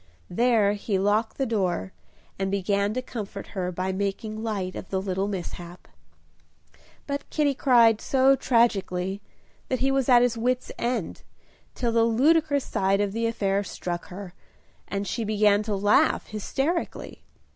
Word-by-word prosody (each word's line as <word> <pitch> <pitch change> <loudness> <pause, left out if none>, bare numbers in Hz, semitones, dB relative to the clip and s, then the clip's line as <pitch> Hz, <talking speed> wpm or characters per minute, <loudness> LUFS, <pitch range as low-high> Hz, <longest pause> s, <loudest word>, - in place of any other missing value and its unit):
There 225 -2 +3
he 205 -1 -2
locked 205 +3 +1
the 270 - 0
door, 185 - -1 0.5
and 195 0 0
began 200 +1 0
to 255 - -2
comfort 205 -5 -7
her 185 -2 -2
by 185 +2 -2
making 200 +3 -3
light 200 -5 -3
of - - -7
the 190 - -1
little 190 0 -2
mishap. 175 -2 -7 1.2
But 280 0 -4
Kitty 295 -2 +1
cried 235 -5 +4
so 270 0 +4
tragically, 195 -7 +1 0.5
that 255 - +1
he 270 +1 +2
was 270 -1 +1
at 245 -1 +7
his 235 -2 0
wit's 250 +2 -1
end, 235 -7 -2 0.5
till 240 -2 -1
the 230 0 +3
ludicrous 285 +5 +3
side 195 +1 +1
of 205 -1 0
the 230 +1 0
affair 200 -3 0
struck 175 -2 -5
her, 185 -1 -9 0.5
and 200 0 -3
she 230 - -2
began 210 -1 +3
to 210 -1 -2
laugh 205 +1 +3
hysterically. 270 - -3
210 Hz, 150 wpm, -25 LUFS, 195-245 Hz, 1.2 s, at